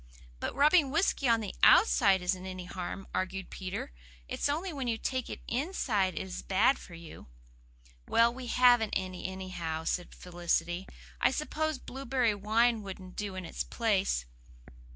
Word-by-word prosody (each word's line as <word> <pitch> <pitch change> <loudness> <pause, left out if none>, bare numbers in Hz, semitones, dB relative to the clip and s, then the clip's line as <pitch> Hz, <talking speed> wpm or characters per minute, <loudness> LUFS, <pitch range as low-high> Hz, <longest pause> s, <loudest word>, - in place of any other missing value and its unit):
"But - - -3
rubbing 295 +1 +5
whisky 305 -3 +1
on 230 -1 +4
the 205 -3 -5
OUTSIDE 195 - +6
isn't 185 +1 -1
any 185 -1 -6
harm," 185 +2 -6
argued 190 0 -3
Peter. 185 - -5 0.4
"It's - - -1
only 330 +5 -2
when 270 -4 -3
you 230 -1 0
take 255 +2 -3
it - - -7
inside 235 - 0
it - - -2
is 190 -1 -6
bad 195 +8 +3
for 175 - -11
you." 165 -1 -11 0.8
"Well, 230 +1 +4
we 255 0 -7
haven't 245 -3 +4
any, 185 -1 -5
anyhow," 180 -4 -4
said 175 +2 -2
Felicity. 175 +1 -2 0.3
"I - - +5
suppose 305 +2 -2
blueberry 255 -3 -1
wine 220 +3 +2
wouldn't 190 -2 -9
do 205 -2 -4
in 185 -1 -5
its - - -5
place?" 200 - 0
205 Hz, 155 wpm, -30 LUFS, 185-255 Hz, 0.8 s, OUTSIDE